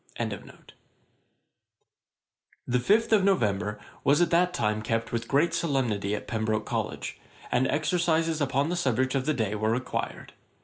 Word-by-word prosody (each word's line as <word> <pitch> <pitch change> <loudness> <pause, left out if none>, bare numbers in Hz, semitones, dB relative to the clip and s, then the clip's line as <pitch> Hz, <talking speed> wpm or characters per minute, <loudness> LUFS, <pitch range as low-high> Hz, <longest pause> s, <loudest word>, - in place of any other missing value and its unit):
A.D. - - -2
1728.] - - -16 1.9
The 125 0 +2
fifth 220 - +3
of 205 -3 +5
November 105 - +1 0.2
was 140 +2 +4
at 175 -1 +2
that 175 +1 +3
time 105 -9 0
kept 115 +1 -2
with 115 0 -2
great 150 +5 +2
solemnity 115 -10 0
at - - -6
Pembroke 110 -1 -1
College, - - -4 0.3
and 130 +1 +2
exercises 165 +1 +1
upon 140 +2 +1
the 175 - -1
subject 130 -5 +1
of 135 0 -1
the 155 - +2
day 110 -3 -1
were 110 +1 0
required. 125 +3 -3
130 Hz, 150 wpm, -27 LUFS, 110-165 Hz, 1.9 s, of